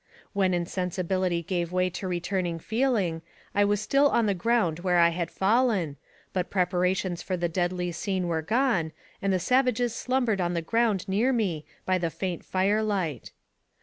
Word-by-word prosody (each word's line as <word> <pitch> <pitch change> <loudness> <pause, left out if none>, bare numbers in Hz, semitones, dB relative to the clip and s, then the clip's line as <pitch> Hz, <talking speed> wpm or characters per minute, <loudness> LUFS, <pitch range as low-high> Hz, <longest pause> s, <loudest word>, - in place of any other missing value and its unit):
When 190 -3 +2
insensibility 180 0 -1
gave 175 0 -2
way 185 0 +1
to 185 - -5
returning 175 -1 -1
feeling, 215 -5 0 0.3
I 205 - +3
was 205 0 +2
still 275 +7 +3
on 235 - +2
the 205 - +2
ground 185 -4 +1
where 180 0 +1
I 170 0 +6
had 170 -1 -3
fallen, 200 - +1 0.4
but 180 -1 -1
prepa 180 -1 +1
rations 180 -1 0
for 185 - -2
the 175 0 0
deadly 180 +1 -1
scene 185 +1 -2
were 165 -2 0
gone, 215 - +1 0.3
and 195 - +1
the 185 - +3
savages 250 +2 +2
slumbered 245 -5 0
on 175 0 0
the 170 - -1
ground 220 0 +1
near 215 +7 +2
me 190 - -1 0.2
by 185 0 +2
the 170 -1 0
faint 180 0 -4
fire 195 +3 +1
light. 185 - -2
185 Hz, 175 wpm, -27 LUFS, 175-215 Hz, 0.4 s, I